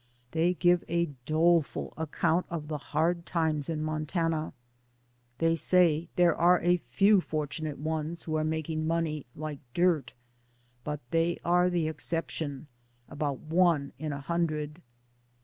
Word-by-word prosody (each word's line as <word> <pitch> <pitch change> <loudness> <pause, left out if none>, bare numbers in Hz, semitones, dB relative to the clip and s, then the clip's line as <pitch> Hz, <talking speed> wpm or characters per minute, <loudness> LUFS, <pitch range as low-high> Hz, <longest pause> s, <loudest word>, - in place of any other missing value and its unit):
They 170 +3 +2
give 175 0 +3
a 170 -2 0 0.2
doleful 165 0 +2
ac 160 -1 -4
count 170 +2 +1
of 155 -3 -5
the 150 -1 -3
hard 165 +4 0
times 160 -4 0
in 155 -2 -2
Montana. 155 +1 -1 0.9
They 165 +3 +2
say: 165 -1 +3
"There 175 -2 +4
are 175 +1 +5
a 175 0 +2
few 195 - +5
fortunate 155 -1 -3
ones 160 +2 -3
who 155 - -3
are 155 - +1
making 155 0 -2
money 160 -4 -1
like 155 -2 -5 0.2
dirt, 175 -4 +2 0.7
but 150 -1 -4
they 165 +1 +2
are 180 +1 +4
the 170 -3 0
exception, 160 -3 -2 0.4
about 145 -2 -3
one 160 -3 +2
in 155 0 -3
a 140 0 -5
hundred." 155 0 -2
160 Hz, 140 wpm, -29 LUFS, 155-170 Hz, 0.9 s, are